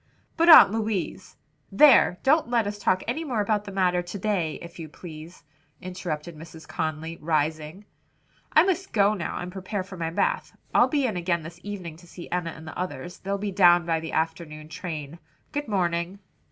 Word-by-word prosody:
"But 335 Hz, +1 st, +3 dB
Aunt 315 Hz, -11 st, +10 dB
Louise 215 Hz, -5 st, -3 dB, 0.2 s
" 150 Hz, 0 st, -42 dB
"There! 260 Hz, -10 st, +7 dB
don't 300 Hz, -1 st, +3 dB
let 235 Hz, -3 st, +2 dB
us 205 Hz, 0 st, -4 dB
talk 185 Hz, -2 st, +1 dB
any 295 Hz, +8 st, -2 dB
more 255 Hz, -8 st, -2 dB
about 210 Hz, 0 st, 0 dB
the 200 Hz, -, -7 dB
matter 180 Hz, -2 st, +1 dB
to 175 Hz, +3 st, -7 dB
day, 185 Hz, -6 st, -1 dB
if 170 Hz, 0 st, -11 dB
you 160 Hz, -2 st, -7 dB
please," 160 Hz, 0 st, -11 dB, 0.4 s
interrupted 175 Hz, -3 st, -5 dB
Mrs. 160 Hz, +1 st, -12 dB
Conly, 160 Hz, +1 st, -4 dB
rising, 155 Hz, +4 st, -2 dB, 0.7 s
"I 310 Hz, -, +6 dB
must 380 Hz, 0 st, -1 dB
go 205 Hz, -1 st, +4 dB
now 185 Hz, -5 st, -4 dB
and 180 Hz, 0 st, -5 dB
prepare 190 Hz, +1 st, -4 dB
for 190 Hz, 0 st, -11 dB
my 165 Hz, -1 st, -2 dB
bath. 485 Hz, -, -1 dB, 0.2 s
I'll -, -, +5 dB
be 285 Hz, -3 st, 0 dB
in 215 Hz, -7 st, -1 dB
again 170 Hz, -2 st, -1 dB
this 170 Hz, +2 st, -10 dB
evening 185 Hz, -6 st, -7 dB
to 175 Hz, +1 st, -17 dB
see 175 Hz, 0 st, -11 dB
Enna 175 Hz, -1 st, -1 dB
and 160 Hz, -1 st, -10 dB
the -, -, -8 dB
others. 175 Hz, -2 st, -5 dB
They'll 200 Hz, +1 st, -3 dB
be 200 Hz, 0 st, -3 dB
down 175 Hz, -2 st, +5 dB
by 165 Hz, -1 st, 0 dB
the 160 Hz, 0 st, -7 dB
afternoon 160 Hz, -1 st, -3 dB
train. 160 Hz, -2 st, -6 dB, 0.3 s
Good 290 Hz, -2 st, -3 dB
morning." 175 Hz, -2 st, -1 dB
180 Hz, 195 wpm, -25 LUFS, 165-205 Hz, 0.7 s, Aunt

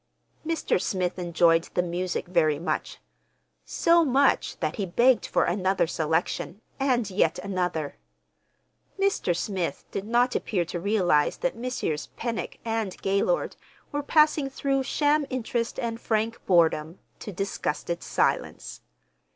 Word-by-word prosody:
Mr. 320 Hz, -, 0 dB
Smith 185 Hz, -1 st, -1 dB
enjoyed 170 Hz, -1 st, +3 dB
the 180 Hz, -, +2 dB
music 180 Hz, +1 st, -2 dB
very 155 Hz, -4 st, +2 dB
much—so 335 Hz, -, -1 dB
much 275 Hz, -1 st, +2 dB
that -, -, -2 dB
he 200 Hz, -, -1 dB
begged 240 Hz, +8 st, +3 dB
for -, -, +2 dB
another 190 Hz, +1 st, +1 dB
selection 160 Hz, +4 st, -1 dB, 0.2 s
and 245 Hz, -6 st, +1 dB
yet 190 Hz, -, +2 dB
another. 180 Hz, -6 st, -2 dB, 1.0 s
Mr. 390 Hz, -, +1 dB
Smith 185 Hz, -3 st, -3 dB
did 195 Hz, -, -4 dB
not 240 Hz, +2 st, +2 dB
appear 180 Hz, -6 st, 0 dB
to 175 Hz, +1 st, -4 dB
realize 180 Hz, -6 st, +2 dB
that -, -, -1 dB
Messrs. 235 Hz, -11 st, -3 dB
Pennock 230 Hz, -2 st, -3 dB
and 225 Hz, -4 st, -2 dB
Gaylord 200 Hz, -, +1 dB, 0.4 s
were 290 Hz, -, -1 dB
passing 300 Hz, -1 st, +3 dB
through 270 Hz, 0 st, 0 dB
sham 290 Hz, +2 st, +1 dB
interest 235 Hz, -2 st, -2 dB
and 230 Hz, 0 st, -3 dB
frank 225 Hz, +1 st, -1 dB
boredom 165 Hz, -2 st, +3 dB, 0.2 s
to 210 Hz, -, -7 dB
disgusted 175 Hz, -3 st, -3 dB
silence. 60 Hz, 0 st, -1 dB
200 Hz, 125 wpm, -26 LUFS, 175-255 Hz, 1.0 s, enjoyed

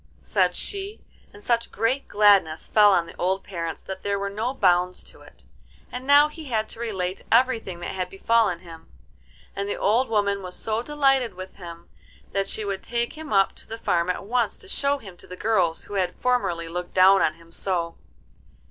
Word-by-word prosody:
said -, -, +1 dB
she, 400 Hz, +1 st, -4 dB, 0.3 s
and 205 Hz, -, -15 dB
such 235 Hz, 0 st, 0 dB
great 255 Hz, +5 st, 0 dB
gladness 200 Hz, -6 st, +4 dB
fell 210 Hz, -1 st, +6 dB
on 175 Hz, -3 st, +3 dB
the 170 Hz, -, -12 dB
old 190 Hz, +2 st, 0 dB
parents 170 Hz, -4 st, -5 dB
that 190 Hz, 0 st, -7 dB
there 200 Hz, 0 st, -1 dB
were 200 Hz, 0 st, -3 dB
no 220 Hz, +5 st, -2 dB
bounds 180 Hz, -6 st, +2 dB
to -, -, -15 dB
it. -, -, -18 dB, 0.5 s
And 250 Hz, +2 st, -6 dB
now 290 Hz, +1 st, +7 dB
he 305 Hz, +1 st, -10 dB
had 220 Hz, -5 st, -1 dB
to -, -, -12 dB
relate 190 Hz, -5 st, -3 dB
everything 230 Hz, -7 st, +2 dB
that -, -, -4 dB
had 185 Hz, -1 st, -3 dB
befallen 195 Hz, -2 st, +1 dB
him, 165 Hz, -3 st, -13 dB, 0.7 s
and 200 Hz, 0 st, -3 dB
the -, -, -1 dB
old 225 Hz, +6 st, +2 dB
woman 200 Hz, -2 st, +1 dB
was 180 Hz, -1 st, -5 dB
so 220 Hz, 0 st, -1 dB
delighted 270 Hz, -5 st, +1 dB
with 185 Hz, +1 st, -8 dB
him 170 Hz, -2 st, -10 dB, 0.4 s
that 195 Hz, 0 st, 0 dB
she 215 Hz, +1 st, -3 dB
would 195 Hz, -1 st, -3 dB
take 235 Hz, 0 st, -2 dB
him 310 Hz, -1 st, -9 dB
up 195 Hz, -1 st, +3 dB
to -, -, -11 dB
the 225 Hz, -, -6 dB
farm 175 Hz, -5 st, 0 dB
at 180 Hz, -, -2 dB
once 235 Hz, -1 st, 0 dB
to -, -, -15 dB
show 285 Hz, -6 st, 0 dB
him 195 Hz, -9 st, -12 dB
to -, -, -15 dB
the 180 Hz, -, -8 dB
girls 185 Hz, -5 st, +1 dB
who -, -, -11 dB
had 185 Hz, -2 st, 0 dB
formerly 210 Hz, -10 st, 0 dB
looked 175 Hz, +1 st, -6 dB
down 190 Hz, +1 st, +6 dB
on 155 Hz, -, +2 dB
him 165 Hz, 0 st, -19 dB
so. 170 Hz, -2 st, -2 dB
200 Hz, 200 wpm, -24 LUFS, 180-235 Hz, 0.7 s, now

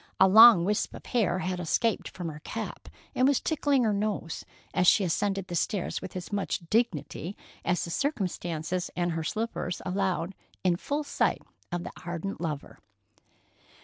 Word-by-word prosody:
A -, -, +8 dB
long 220 Hz, -3 st, +9 dB
wisp 210 Hz, +2 st, 0 dB
of -, -, -11 dB
hair 225 Hz, -7 st, +1 dB
had 180 Hz, 0 st, -2 dB
escaped 200 Hz, +5 st, 0 dB
from 175 Hz, -2 st, -6 dB
her 150 Hz, -1 st, -8 dB
cap -, -, -6 dB, 0.2 s
and 255 Hz, -, +3 dB
was 280 Hz, -2 st, +3 dB
tickling 285 Hz, -4 st, +1 dB
her 215 Hz, -2 st, +2 dB
nose, 200 Hz, -4 st, -2 dB, 0.3 s
as 180 Hz, -, +2 dB
she 205 Hz, -, +6 dB
ascended 195 Hz, +2 st, 0 dB
the 175 Hz, -, -6 dB
stairs 175 Hz, +2 st, -1 dB
with -, -, -8 dB
as 185 Hz, +2 st, -6 dB
much 195 Hz, -3 st, -2 dB
dignity 190 Hz, -, 0 dB, 0.3 s
as 180 Hz, -, +1 dB
the 170 Hz, -, -5 dB
circumstances 180 Hz, -, -2 dB
and 175 Hz, -1 st, 0 dB
her 165 Hz, -1 st, -2 dB
slippers 215 Hz, -1 st, -2 dB
allowed, 185 Hz, -1 st, -1 dB, 0.3 s
in 180 Hz, -2 st, +3 dB
full 290 Hz, -, -2 dB
sight -, -, 0 dB, 0.3 s
of 175 Hz, 0 st, -2 dB
the -, -, -6 dB
ardent 175 Hz, +3 st, -4 dB
lover. 155 Hz, -4 st, -4 dB
185 Hz, 165 wpm, -28 LUFS, 175-215 Hz, 0.3 s, long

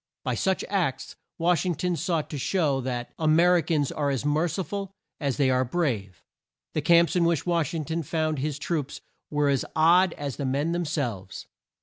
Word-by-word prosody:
By -, -, -1 dB
such 190 Hz, -1 st, 0 dB
acts 180 Hz, -9 st, -2 dB, 0.2 s
Wash 170 Hz, -1 st, +2 dB
ing 180 Hz, -2 st, 0 dB
ton 180 Hz, +3 st, -1 dB
sought 165 Hz, -2 st, -1 dB
to 145 Hz, -, -4 dB
show 145 Hz, -4 st, +1 dB
that 125 Hz, -1 st, -4 dB
"A 160 Hz, -, 0 dB
mer 175 Hz, +3 st, +5 dB
i -, -, +2 dB
cans 150 Hz, -3 st, 0 dB
are 145 Hz, -2 st, -1 dB
as 135 Hz, 0 st, -2 dB
mer 150 Hz, +3 st, +2 dB
ci 190 Hz, +3 st, -2 dB
ful 195 Hz, +3 st, -5 dB, 0.3 s
as 140 Hz, -4 st, -1 dB
they 135 Hz, -2 st, +3 dB
are 130 Hz, 0 st, +2 dB
brave." 120 Hz, -, -2 dB, 0.5 s
The 155 Hz, -, 0 dB
camps 170 Hz, +3 st, +4 dB
in 175 Hz, -, +3 dB
which 170 Hz, -2 st, +1 dB
Wash 170 Hz, -3 st, 0 dB
ing 155 Hz, -2 st, -3 dB
ton 165 Hz, +2 st, -2 dB
found 155 Hz, -1 st, -1 dB
his 145 Hz, +1 st, -2 dB
troops 150 Hz, -2 st, -3 dB, 0.3 s
were 150 Hz, -1 st, +1 dB
as 140 Hz, -2 st, +2 dB
odd 175 Hz, +3 st, +5 dB
as 140 Hz, -3 st, -5 dB
the 140 Hz, -, -3 dB
men 140 Hz, +5 st, 0 dB
them 175 Hz, 0 st, -1 dB
selves. 120 Hz, -, -4 dB
155 Hz, 210 wpm, -26 LUFS, 140-170 Hz, 0.5 s, mer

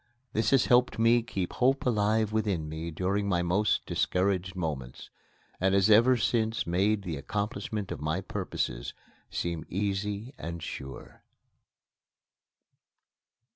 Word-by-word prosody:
This 110 Hz, +1 st, +1 dB
has 135 Hz, -2 st, +4 dB
helped 125 Hz, 0 st, +4 dB
to 115 Hz, +1 st, +4 dB
keep 95 Hz, -5 st, -4 dB
Hope 135 Hz, +2 st, +2 dB
alive 110 Hz, -2 st, +2 dB
within 100 Hz, -8 st, 0 dB
me 80 Hz, +2 st, -5 dB
during 95 Hz, +5 st, -1 dB
my 90 Hz, -2 st, +1 dB
most 95 Hz, +5 st, +1 dB
discouraged 95 Hz, 0 st, 0 dB
moments, 75 Hz, -9 st, -5 dB, 0.5 s
and 95 Hz, +1 st, +2 dB
has 100 Hz, +2 st, +4 dB
ever 120 Hz, +4 st, +6 dB
since 110 Hz, +1 st, 0 dB
made 100 Hz, +4 st, +1 dB
the 85 Hz, -5 st, -4 dB
accomplishment 105 Hz, +4 st, -3 dB
of -, -, -5 dB
my 80 Hz, +4 st, 0 dB
purposes -, -, -3 dB, 0.3 s
seem 85 Hz, -2 st, -3 dB
easy 100 Hz, +5 st, -2 dB
and 85 Hz, 0 st, -5 dB
sure. 65 Hz, -2 st, -8 dB
100 Hz, 125 wpm, -29 LUFS, 85-110 Hz, 0.5 s, ever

